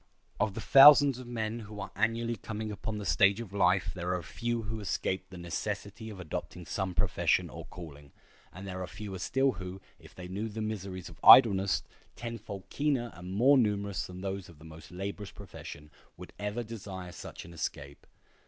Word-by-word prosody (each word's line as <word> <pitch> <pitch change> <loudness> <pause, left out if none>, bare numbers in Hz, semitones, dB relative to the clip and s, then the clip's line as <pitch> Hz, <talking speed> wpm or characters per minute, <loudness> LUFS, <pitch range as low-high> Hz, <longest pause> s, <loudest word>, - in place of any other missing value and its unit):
Of 100 -1 0
the - - -4
thousands 140 -1 +8
of 125 - -9
men 115 -1 -3
who 105 -1 -9
are 100 0 -6
annually 115 +1 0
coming 110 +1 -5
upon 105 +1 -4
the 105 - -5
stage 95 - +4
of 110 -5 -7
life 90 -2 +2
there 90 0 -2
are 90 - -4
few 120 +3 -3
who 110 +1 -4
escape 95 -2 -2
the 95 - -10
necessity 100 +5 -4
of 100 -3 -9
adopting 90 +1 -6
some 95 -1 -3
profession - - +1
or - - -8
calling; 75 -5 -11 0.4
and 95 +2 -9
there 95 -1 -5
are 90 - -4
fewer 100 0 -7
still 135 +7 +2
who, 95 -1 -7 0.2
if - - -16
they 90 -1 -8
knew 100 +5 -4
the 110 +1 -7
miseries 100 -4 -4
of - - -13
idleness—tenfold 105 -1 +4
keener 140 -5 0
and 90 +1 -9
more 135 +6 +6
numerous 100 -4 0
than 90 0 -9
those 95 -2 -4
of 85 - -15
the 80 - -15
most 80 0 -12
laborious 100 +3 -5
profession—would 75 -3 -12
ever 105 +4 -2
desire 95 -5 -7
such 90 - -9
an 85 - -12
escape. 70 -3 -6
100 Hz, 180 wpm, -30 LUFS, 90-110 Hz, 0.4 s, thousands